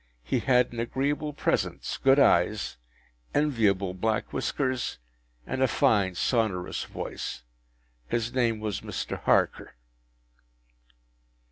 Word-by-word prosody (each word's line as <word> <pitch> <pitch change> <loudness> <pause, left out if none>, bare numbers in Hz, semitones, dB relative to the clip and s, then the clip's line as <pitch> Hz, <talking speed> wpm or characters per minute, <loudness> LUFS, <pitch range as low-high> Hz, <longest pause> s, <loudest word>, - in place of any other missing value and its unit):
He - - 0
had 125 -2 +3
an 120 - -5
agreeable 140 +6 -1
presence, 145 - -1
good 135 +1 +5
eyes, 105 - +3 0.6
enviable 105 -10 +2
black 110 +3 -1
whiskers, 130 -3 -1 0.5
and 130 - -3
a 130 - +5
fine 105 -8 +2
sonorous 100 -4 0
voice. - - -6 0.6
His 115 - -1
name 120 -4 +1
was 105 -2 -3
Mr. - - -4
Harker. - - +1
115 Hz, 105 wpm, -27 LUFS, 105-130 Hz, 0.6 s, good